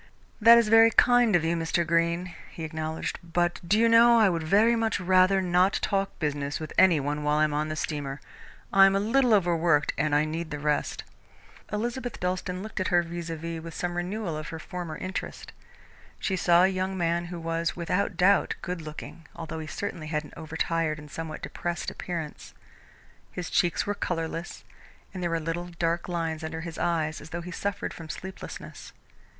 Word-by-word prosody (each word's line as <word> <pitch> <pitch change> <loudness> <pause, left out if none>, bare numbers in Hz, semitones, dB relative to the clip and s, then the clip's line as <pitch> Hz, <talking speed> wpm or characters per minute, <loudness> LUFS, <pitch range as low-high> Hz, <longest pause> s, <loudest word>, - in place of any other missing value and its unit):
"That 230 +2 +9
is 235 -2 +4
very 225 +1 +7
kind 245 -3 +4
of 170 - +3
you, 165 +1 +1
Mr. 170 +1 0
Greene," 170 +2 0 0.2
he 165 - -8
acknowledged, 160 0 -4
"but 175 +1 -1
do 200 +5 +2
you 230 +1 +4
know 235 +1 +7
I 215 -3 +5
would 170 -2 -1
very 210 +9 +4
much 225 -3 0
rather 185 +1 +4
not 180 +2 +3
talk 195 -1 -1
business 145 -2 -2
with 155 - -7
any 175 -5 +5
one 145 +2 -2
while 150 0 +1
I 155 - +4
am 155 -1 +1
on 150 +1 -1
the 155 - -3
steamer? 145 -3 -3 0.5
I 195 0 +8
am 195 - +2
a - - +3
little 240 +4 +2
overworked 170 -6 +3
and 150 0 +2
I 150 +1 +3
need 160 +1 -4
the 150 - -4
rest." 150 0 -1 0.7
Elizabeth 240 +3 -3
Dalstan 180 +1 -2
looked 215 -2 -6
at 185 - 0
her 175 -1 +3
vis 170 0 -6
à 165 - -4
vis 165 +1 -5
with 165 0 -9
some 175 0 -3
renewal 180 0 -3
of 155 0 -5
her 160 - -6
former 170 -1 -6
interest. 185 +1 -6 0.7
She 190 - -1
saw 175 -1 +4
a - - +6
young 190 0 -2
man 170 0 0
who 175 0 -6
was, 165 0 -2
without 180 +2 -1
doubt, 195 +3 +3
good 180 -2 -4
looking, 155 +1 -9
although 160 -1 -6
he 155 - -6
certainly 165 -2 -5
had 155 -1 -1
an 150 - -14
over 160 0 -7
tired 165 -2 0
and 150 -1 -12
somewhat 160 0 -6
depressed 175 0 -4
appearance. 165 -4 -6 0.8
His 180 -2 -6
cheeks 175 -2 +2
were 205 - -1
colourless, 165 -3 -4 0.5
and 185 - -6
there 175 - 0
were 165 0 0
little 165 +2 -3
dark 170 +1 -1
lines 165 -2 -2
under 160 +1 -4
his 165 -1 -7
eyes 160 -3 -1
as 150 - -11
though 170 +1 -4
he 180 +1 -8
suffered 200 +2 -3
from 165 -2 -10
sleeplessness. 190 +4 -8
170 Hz, 200 wpm, -27 LUFS, 160-190 Hz, 0.8 s, That